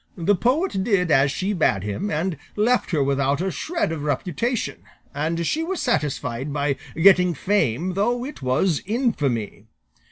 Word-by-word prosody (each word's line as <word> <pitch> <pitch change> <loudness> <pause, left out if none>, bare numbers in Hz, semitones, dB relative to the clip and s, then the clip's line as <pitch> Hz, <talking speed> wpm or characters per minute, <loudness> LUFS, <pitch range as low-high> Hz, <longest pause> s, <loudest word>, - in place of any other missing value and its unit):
The 175 +4 +2
poet 250 - +1
did 190 -6 +1
as 135 0 +4
she 190 +7 -2
bade 105 - +1
him, 105 - -3
and 165 +2 -1 0.2
left 235 +4 +2
her 155 -6 +1
without 140 +1 +1
a 190 +2 -1
shred 335 - -2
of 160 -3 -4
reputation, 175 - -2 0.3
and 165 +3 -1
she 315 - 0
was 370 +2 -3
satisfied 145 -3 -1
by 140 -1 0 0.2
getting 180 0 +5
fame 180 - 0
though 240 +6 0
it 290 - -8
was 135 +6 +1
infamy. 140 - -1
170 Hz, 155 wpm, -23 LUFS, 140-205 Hz, 0.3 s, getting